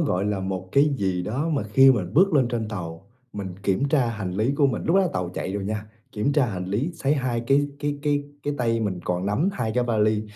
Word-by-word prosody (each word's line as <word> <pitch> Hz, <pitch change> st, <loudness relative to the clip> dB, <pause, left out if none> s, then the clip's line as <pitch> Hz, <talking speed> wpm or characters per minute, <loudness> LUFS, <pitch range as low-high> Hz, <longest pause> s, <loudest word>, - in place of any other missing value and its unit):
gọi 100 Hz, -, 0 dB
là 105 Hz, -2 st, -1 dB
một 95 Hz, -1 st, -4 dB
cái 140 Hz, +1 st, +4 dB
gì 95 Hz, -2 st, 0 dB
đó 135 Hz, -, -2 dB
mà 145 Hz, -9 st, 0 dB
khi 135 Hz, +6 st, +6 dB
mình 100 Hz, -5 st, 0 dB
bước 185 Hz, +1 st, +5 dB
lên 130 Hz, -4 st, +4 dB
trên 115 Hz, -3 st, -2 dB
tàu, 90 Hz, -3 st, -6 dB, 0.3 s
mình 95 Hz, -3 st, -5 dB
kiểm 105 Hz, +9 st, +1 dB
tra 135 Hz, -5 st, +3 dB
hành 105 Hz, -5 st, -4 dB
lý 110 Hz, +8 st, +1 dB
của 140 Hz, -, +4 dB
mình 125 Hz, -, -2 dB
lúc 170 Hz, +4 st, +3 dB
đó 195 Hz, -, +5 dB
là 180 Hz, -, +1 dB
tàu 90 Hz, -1 st, -2 dB
chạy 95 Hz, -, -3 dB
rồi 100 Hz, -1 st, -3 dB
nha, 105 Hz, +1 st, -3 dB, 0.3 s
kiểm 105 Hz, +7 st, 0 dB
tra 140 Hz, -4 st, +3 dB
hành 90 Hz, -4 st, -4 dB
lý 110 Hz, -, -1 dB
sấy 145 Hz, -1 st, +1 dB
hai 125 Hz, -4 st, -1 dB
cái 145 Hz, +1 st, +3 dB
cái 145 Hz, -1 st, -2 dB
cái 145 Hz, -1 st, +1 dB, 0.2 s
cái 145 Hz, 0 st, -2 dB
tay 115 Hz, -2 st, +1 dB
mình 95 Hz, -5 st, -2 dB
còn 90 Hz, +2 st, -1 dB
nắm 140 Hz, -, +1 dB
2 110 Hz, -3 st, -2 dB
cái 125 Hz, -1 st, +2 dB
vali, 110 Hz, -2 st, +2 dB
110 Hz, 255 wpm, -24 LUFS, 95-140 Hz, 0.3 s, khi